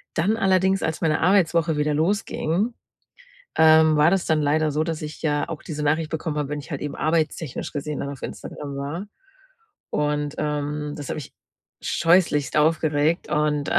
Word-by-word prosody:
Dann 205 +8 +1
allerdings, 190 -1 +2
als 160 0 -2
meine 155 -2 +1
Arbeitswoche 170 -3 +3
wieder 150 0 +1
losging, 190 +4 0 0.8
ähm, 160 -1 +6
war 150 +2 +5
das 190 -1 +1
dann 155 -1 +2
leider 155 +1 +2
so, 150 +2 +1
dass 160 -2 -4
ich 150 0 -7
ja 145 -2 0
auch - - -6
diese 150 -3 -5
Nachricht 155 +2 +1
bekommen 160 -1 -3
habe, 145 -2 -2
wenn 150 0 -3
ich 145 - -13
halt 145 - -4
eben 145 - -4
arbeitstechnisch 155 -3 -1
gesehen 150 0 -4
dann 140 - -3
auf 140 - -9
Instagram 140 -2 -7
war. 150 +8 -4 0.9
Und, 150 -1 -1
ähm, 150 0 -2
das 145 - -7
hat - - -2
mich 150 - -8 0.5
scheußlichst 165 -5 +2
aufgeregt 155 +1 +2
und, 150 -1 0
155 Hz, 170 wpm, -23 LUFS, 150-165 Hz, 0.9 s, ähm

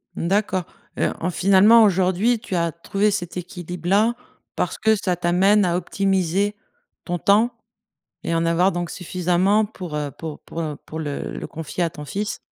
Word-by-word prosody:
D'accord. 190 +1 0 0.3
Heu, - - +1
en 180 - -1
finalement 200 +5 +6
aujourd'hui 190 +4 +2
tu 195 -4 -5
as 170 -1 +1
trouvé 200 +5 0
cet 180 -2 -4
équilibre 180 -1 -6
là, 215 +5 +3 0.4
parce - - -2
que 220 0 +3
ça 185 -3 -1
t'amène 185 +4 +3
à 175 -1 +1
optimiser 195 +1 0 0.5
ton 175 0 -2
temps 215 +4 +3 0.7
et 170 - -1
en 165 0 +1
avoir 175 +3 +3
donc 175 -1 -3
suffisamment 185 +3 +1
pour, 180 -7 -7
heu, 145 -2 -3
pour 155 0 -7
pour, 165 - -8
heu, 155 -2 -3
pour 160 - -7
le 145 -2 -4
le - - -5
confier 165 +2 -4
à 170 - +1
ton 150 -2 -9
fils. 205 +7 -3
180 Hz, 175 wpm, -22 LUFS, 170-200 Hz, 0.7 s, finalement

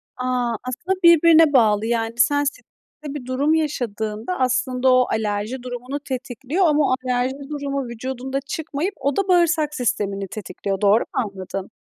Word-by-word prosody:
A, 250 -2 -1
aslında 335 +10 -2
birbirine 330 -2 +6
bağlı. 220 -4 +4
Yani, 230 -1 -1
sen 285 +4 +3
stresli 285 - -4 0.5
bir 260 - -6
durum 275 +5 +1
yaşadığında, 235 - -2
aslında 255 0 +2
o 255 0 +5
alerji 220 +3 -2
durumunu 250 +3 -5
tetikliyor, 265 - -2
ama 300 -1 +3
o - - +4
alerji 250 +1 0
durumu 280 -3 -3
vücudunda 260 +3 -4
çıkmayıp, 320 +6 -3
o 280 -1 0
da 395 0 0
bağırsak 335 -4 +2
sistemini 200 -6 -1
tetikliyor. 195 -1 -5
Doğru 205 +2 +5
mu - - -4 0.2
anladım? 195 0 -7
255 Hz, 145 wpm, -22 LUFS, 230-290 Hz, 0.5 s, birbirine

